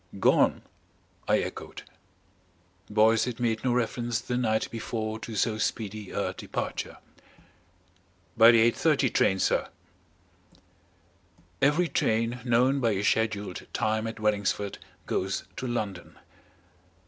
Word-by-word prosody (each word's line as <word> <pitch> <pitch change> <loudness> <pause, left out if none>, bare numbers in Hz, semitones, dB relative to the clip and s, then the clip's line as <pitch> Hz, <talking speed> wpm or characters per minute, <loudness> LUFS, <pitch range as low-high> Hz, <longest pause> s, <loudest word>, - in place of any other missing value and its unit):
"Gone?" - - +3 0.6
I - - +4
echoed. - - -7 1.1
Boyce 110 +1 +4
had 125 -1 -5
made 115 -2 0
no 130 - +1
reference 120 -1 -1
the 125 - -4
night 110 -3 +1
before 110 -1 -4
to 110 0 -7
so 110 0 0
speedy 105 -2 -3
a - - -2
departure. - - -5 1.4
"By 115 +1 +8
the 115 0 +6
8.30 140 -2 +1
train, 95 - +3
sir." - - +1 1.9
Every 150 +5 +3
train 115 -2 0
known 125 +3 +3
by 115 -4 +2
a 100 0 -2
scheduled 105 -3 -1
time 110 +1 0
at 115 0 -6
Wellingsford 105 -1 -1 0.3
goes 95 +1 -2
to 130 - -3
London. 105 -7 -4
110 Hz, 115 wpm, -27 LUFS, 110-120 Hz, 1.9 s, By